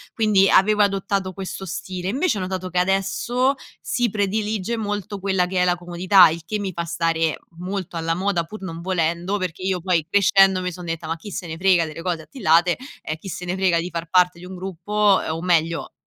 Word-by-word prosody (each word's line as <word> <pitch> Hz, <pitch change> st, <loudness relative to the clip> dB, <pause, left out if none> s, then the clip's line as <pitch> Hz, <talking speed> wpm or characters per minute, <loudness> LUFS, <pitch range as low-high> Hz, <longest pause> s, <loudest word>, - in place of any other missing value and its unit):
Quindi 210 Hz, -4 st, +4 dB
avevo 210 Hz, +2 st, +4 dB
adottato 195 Hz, -1 st, -1 dB
questo 195 Hz, 0 st, -6 dB
stile, 180 Hz, +1 st, -5 dB
invece 270 Hz, -, 0 dB
ho -, -, -3 dB
notato 185 Hz, 0 st, -4 dB
che 180 Hz, -, -4 dB
adesso 195 Hz, +8 st, +1 dB, 0.3 s
si 240 Hz, -2 st, 0 dB
predilige 210 Hz, +1 st, -1 dB
molto 205 Hz, -1 st, -4 dB
quella 190 Hz, -2 st, +1 dB
che 185 Hz, 0 st, -1 dB
è -, -, +4 dB
la 180 Hz, 0 st, +2 dB
comodità, 175 Hz, +1 st, +5 dB
il 165 Hz, +1 st, -4 dB
che 210 Hz, +4 st, -2 dB
mi 195 Hz, -2 st, -3 dB
fa 170 Hz, 0 st, -3 dB
stare 165 Hz, -1 st, 0 dB, 0.2 s
molto 185 Hz, -2 st, -4 dB
alla 165 Hz, 0 st, -1 dB
moda 185 Hz, -2 st, 0 dB
pur 215 Hz, +4 st, -10 dB
non 165 Hz, -2 st, -6 dB
volendo, 175 Hz, +2 st, -1 dB
perché 185 Hz, -2 st, -4 dB
io 190 Hz, -1 st, 0 dB
poi 170 Hz, -4 st, +1 dB
crescendo 195 Hz, -1 st, +4 dB
mi 180 Hz, 0 st, -2 dB
son 180 Hz, +1 st, -9 dB
detta: 165 Hz, -1 st, -4 dB
"Ma 165 Hz, -, -1 dB
chi 205 Hz, +6 st, -10 dB
se 180 Hz, -, -5 dB
ne 160 Hz, 0 st, -6 dB
frega 180 Hz, -2 st, +3 dB
delle 155 Hz, +2 st, -8 dB
cose 170 Hz, -3 st, -2 dB
attillate, 175 Hz, -, +2 dB, 0.3 s
e 155 Hz, -, -4 dB
chi 195 Hz, -, -11 dB
se 180 Hz, -1 st, -5 dB
ne 180 Hz, +1 st, -2 dB
frega 185 Hz, -3 st, +2 dB
di 175 Hz, +2 st, -3 dB
far 170 Hz, 0 st, -4 dB
parte 180 Hz, -1 st, +3 dB
di 180 Hz, -, -10 dB
un 185 Hz, 0 st, -8 dB
gruppo" 195 Hz, +3 st, +1 dB
ehm 160 Hz, -, -3 dB
o 165 Hz, -, -5 dB
meglio 170 Hz, -2 st, 0 dB
185 Hz, 215 wpm, -22 LUFS, 170-195 Hz, 0.3 s, comodità